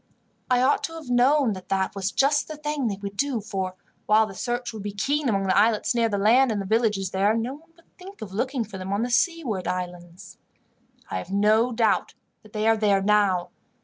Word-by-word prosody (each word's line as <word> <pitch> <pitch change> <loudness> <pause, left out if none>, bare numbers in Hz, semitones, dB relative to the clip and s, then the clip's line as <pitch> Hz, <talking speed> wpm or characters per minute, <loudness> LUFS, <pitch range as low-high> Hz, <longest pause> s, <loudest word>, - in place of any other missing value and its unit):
I 250 0 +3
ought 275 +2 +2
to 325 - -8
have 315 -6 -8
known 255 0 +3
that 185 -1 -10
that 190 -1 0
was 195 0 -2
just 285 +4 +2
the 310 - -7
thing 295 -3 -2
they 200 -3 -3
would 200 0 -5
do, 275 0 -1
for 190 -3 -4 0.3
while 215 +1 +5
the 205 - -9
search 240 +4 -3
would 215 - -7
be 205 0 -5
keen 280 +7 0
among 195 -3 0
the 190 -1 +1
islets 215 +3 +3
near 230 -1 +1
the 205 - -1
land, 235 +5 +4
and 210 - -1
the 195 - -4
villages 210 -3 0
there, 200 +4 +2
no 235 +3 -2
one 310 +4 -15
would 335 - -28
think 385 +2 -12
of 190 -3 -9
looking 255 +4 -1
for 195 -3 -9
them 190 +1 -4
on 205 +3 0
the 245 - -3
seaward 245 - 0
islands. 180 0 -6 0.7
"I 95 - -2
have - - -9
no 215 +4 +3
doubt 225 -1 +1 0.4
they 215 0 -1
are 225 0 +4
there 200 -2 +2
now. 200 -3 +2
220 Hz, 220 wpm, -24 LUFS, 195-250 Hz, 0.7 s, while